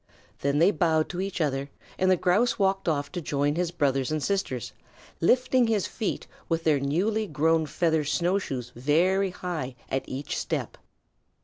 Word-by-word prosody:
Then 140 Hz, +1 st, 0 dB
they 170 Hz, +6 st, +5 dB
bowed 160 Hz, -5 st, +1 dB
to 180 Hz, +1 st, -3 dB
each 195 Hz, -1 st, -3 dB
other 140 Hz, -3 st, -1 dB, 0.3 s
and 185 Hz, -, +3 dB
the 185 Hz, -, +5 dB
Grouse 195 Hz, +7 st, +2 dB
walked 195 Hz, -2 st, +1 dB
off 145 Hz, -2 st, -1 dB
to 180 Hz, -, -4 dB
join 145 Hz, -1 st, 0 dB
his 175 Hz, +1 st, 0 dB
brothers 135 Hz, -6 st, 0 dB
and 155 Hz, -2 st, -1 dB
sisters, 190 Hz, -, -2 dB, 0.5 s
lifting 250 Hz, +5 st, +3 dB
his 215 Hz, -4 st, +1 dB
feet 220 Hz, -, -3 dB, 0.2 s
with 165 Hz, -1 st, 0 dB
their 155 Hz, -3 st, +3 dB
newly 200 Hz, +11 st, 0 dB
grown 160 Hz, 0 st, +2 dB
feather 160 Hz, 0 st, +1 dB
snow 170 Hz, +7 st, +1 dB
shoes 125 Hz, -9 st, -5 dB
very 175 Hz, +10 st, +2 dB
high 170 Hz, -8 st, -5 dB
at 135 Hz, -, -2 dB
every 135 Hz, +2 st, -5 dB
step. -, -, -3 dB
165 Hz, 170 wpm, -27 LUFS, 145-190 Hz, 0.5 s, they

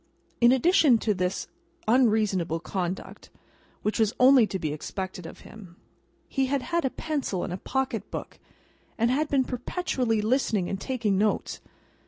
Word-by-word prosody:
In 240 Hz, 0 st, +6 dB
addition 270 Hz, -1 st, +5 dB
to 215 Hz, -1 st, 0 dB
this 180 Hz, -1 st, -2 dB, 0.4 s
unreasonable 215 Hz, -8 st, +2 dB
conduct 180 Hz, +1 st, -5 dB, 0.5 s
(which 210 Hz, -, -1 dB
was 220 Hz, -1 st, +2 dB
only 255 Hz, -3 st, +7 dB
to 195 Hz, -, -3 dB
be 155 Hz, -4 st, -3 dB
expected 185 Hz, +3 st, -6 dB
of -, -, -12 dB
him), 190 Hz, -6 st, -13 dB, 0.5 s
he 270 Hz, -1 st, 0 dB
had 275 Hz, -1 st, -1 dB
had 340 Hz, 0 st, -1 dB
a 265 Hz, -, +1 dB
pencil 280 Hz, -, -3 dB
and 180 Hz, -, -4 dB
a -, -, -3 dB
pocket 265 Hz, +5 st, -2 dB
book, -, -, -7 dB, 0.6 s
and 230 Hz, +2 st, +2 dB
had 295 Hz, +4 st, +1 dB
been 270 Hz, -2 st, +3 dB
perpetually 250 Hz, -3 st, -1 dB
listening 215 Hz, -4 st, +1 dB
and 195 Hz, 0 st, -4 dB
taking 225 Hz, -7 st, 0 dB
notes. 210 Hz, +1 st, 0 dB
220 Hz, 155 wpm, -26 LUFS, 190-265 Hz, 0.6 s, only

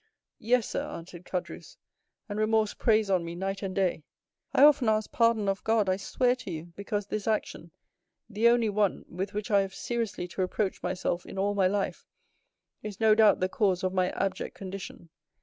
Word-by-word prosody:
"Yes, 240 Hz, 0 st, +2 dB
sir," -, -, -2 dB
answered 175 Hz, +1 st, -9 dB
Caderousse; 180 Hz, -2 st, -6 dB, 0.5 s
"and 205 Hz, -1 st, -4 dB
remorse 215 Hz, -1 st, +2 dB
preys 220 Hz, -2 st, +2 dB
on 185 Hz, -2 st, +2 dB
me 170 Hz, 0 st, -6 dB
night 195 Hz, +2 st, -3 dB
and 190 Hz, -2 st, -4 dB
day. 185 Hz, -5 st, 0 dB, 0.5 s
I 270 Hz, -, +4 dB
often 285 Hz, -6 st, +6 dB
ask 215 Hz, 0 st, 0 dB
pardon 230 Hz, -3 st, +2 dB
of 195 Hz, 0 st, -1 dB
God, 220 Hz, -2 st, +2 dB
I 185 Hz, 0 st, +2 dB
swear 245 Hz, +5 st, +1 dB
to 250 Hz, -, -9 dB
you, 170 Hz, 0 st, -7 dB
because 205 Hz, 0 st, -3 dB
this 210 Hz, +1 st, -4 dB
action, 210 Hz, -6 st, -2 dB, 0.6 s
the 220 Hz, +1 st, +2 dB
only 235 Hz, -2 st, +3 dB
one 205 Hz, -1 st, 0 dB
with 190 Hz, +4 st, -5 dB
which 210 Hz, +1 st, -3 dB
I 200 Hz, -1 st, +5 dB
have 195 Hz, 0 st, -5 dB
seriously 230 Hz, -7 st, -3 dB
to 190 Hz, -, -4 dB
reproach 190 Hz, +1 st, -1 dB
myself 180 Hz, -1 st, -2 dB
in -, -, -9 dB
all 200 Hz, +1 st, +1 dB
my 195 Hz, -2 st, +3 dB
life, 200 Hz, +1 st, -2 dB, 0.7 s
is 210 Hz, -2 st, -7 dB
no 220 Hz, -1 st, +5 dB
doubt 215 Hz, -3 st, +5 dB
the 185 Hz, -, +3 dB
cause 190 Hz, -2 st, 0 dB
of 185 Hz, 0 st, 0 dB
my 185 Hz, -1 st, +2 dB
abject 195 Hz, -1 st, -3 dB
condition. 190 Hz, -3 st, -8 dB
200 Hz, 190 wpm, -28 LUFS, 185-220 Hz, 0.7 s, often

